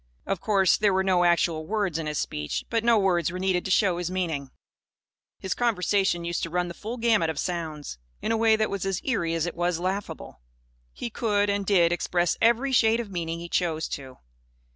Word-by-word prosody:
Of 195 Hz, -3 st, -2 dB
course, 195 Hz, -4 st, +3 dB
there 205 Hz, -3 st, +2 dB
were 190 Hz, -, +2 dB
no 185 Hz, -2 st, +3 dB
actual 165 Hz, -2 st, +1 dB
words 200 Hz, -6 st, -1 dB
in 160 Hz, -, -4 dB
his 150 Hz, 0 st, -3 dB
speech. 75 Hz, 0 st, -3 dB
But 230 Hz, -1 st, +1 dB
no 235 Hz, -1 st, +4 dB
words 180 Hz, -5 st, +1 dB
were 180 Hz, -, -5 dB
needed 185 Hz, -1 st, 0 dB
to -, -, -3 dB
show 185 Hz, -3 st, +2 dB
his 175 Hz, -1 st, -2 dB
meaning. 165 Hz, -7 st, -2 dB, 0.9 s
His 190 Hz, -, -3 dB
conversation 195 Hz, -6 st, +1 dB
used 170 Hz, 0 st, -2 dB
to 165 Hz, -, -3 dB
run 180 Hz, +1 st, -1 dB
the -, -, -6 dB
full 225 Hz, +7 st, -6 dB
gamut 225 Hz, -8 st, +2 dB
of 160 Hz, -, -4 dB
sounds, 155 Hz, -, -4 dB, 0.2 s
in -, -, -2 dB
a -, -, +2 dB
way 225 Hz, 0 st, +4 dB
that 215 Hz, 0 st, 0 dB
was 200 Hz, -2 st, -3 dB
as 195 Hz, -1 st, -1 dB
eerie 175 Hz, -11 st, 0 dB
as 165 Hz, 0 st, 0 dB
it 175 Hz, -, -3 dB
was 175 Hz, 0 st, -1 dB
laughable. 190 Hz, -, -4 dB, 0.5 s
He 235 Hz, -, -6 dB
could 205 Hz, -3 st, +1 dB
and 200 Hz, -1 st, -2 dB
did 175 Hz, -4 st, +4 dB
express 175 Hz, 0 st, 0 dB
every 235 Hz, +4 st, +3 dB
shade 225 Hz, -2 st, +4 dB
of 225 Hz, -4 st, -5 dB
meaning 165 Hz, -2 st, -3 dB
he 170 Hz, -, -6 dB
chose 165 Hz, -3 st, -1 dB
to. 130 Hz, -2 st, -7 dB
185 Hz, 210 wpm, -26 LUFS, 170-205 Hz, 0.9 s, no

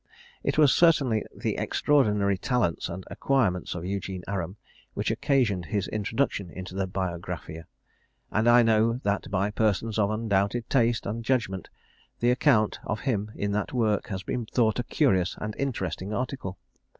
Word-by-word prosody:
It -, -, 0 dB
was 150 Hz, -4 st, +6 dB
certainly 140 Hz, -10 st, +4 dB
the -, -, -3 dB
extraordinary 105 Hz, -9 st, +2 dB
talents 105 Hz, -4 st, 0 dB
and 90 Hz, +2 st, -6 dB
acquirements 110 Hz, -13 st, 0 dB
of 90 Hz, -1 st, -5 dB
Eugene 95 Hz, -1 st, -4 dB
Aram 95 Hz, -2 st, -3 dB, 0.4 s
which -, -, 0 dB
occasioned 120 Hz, -, +1 dB
his 100 Hz, +2 st, -1 dB
introduction 105 Hz, -2 st, -1 dB
into 90 Hz, +1 st, -8 dB
the 95 Hz, 0 st, -1 dB
Biographia; 85 Hz, -3 st, -4 dB, 0.7 s
and 110 Hz, +3 st, +3 dB
I 120 Hz, 0 st, +7 dB
know 115 Hz, 0 st, +3 dB
that 100 Hz, 0 st, -1 dB
by 100 Hz, +1 st, 0 dB
persons 110 Hz, +1 st, 0 dB
of 100 Hz, -1 st, +3 dB
undoubted 110 Hz, +1 st, 0 dB
taste 120 Hz, -3 st, +2 dB
and 115 Hz, +3 st, -3 dB
judgment, 110 Hz, -7 st, -1 dB, 0.5 s
the 120 Hz, +1 st, +3 dB
account 125 Hz, -5 st, +3 dB
of 110 Hz, -, -3 dB
him 105 Hz, -5 st, -1 dB
in 100 Hz, 0 st, -2 dB
that 105 Hz, +4 st, -2 dB
work 110 Hz, -5 st, +1 dB
has 95 Hz, -2 st, -4 dB
been 120 Hz, +2 st, -3 dB
thought 115 Hz, -1 st, +1 dB
a -, -, 0 dB
curious 95 Hz, -, +1 dB
and 105 Hz, 0 st, -4 dB
interesting 95 Hz, -, -2 dB
article. 125 Hz, -7 st, -4 dB
105 Hz, 155 wpm, -27 LUFS, 95-120 Hz, 0.7 s, I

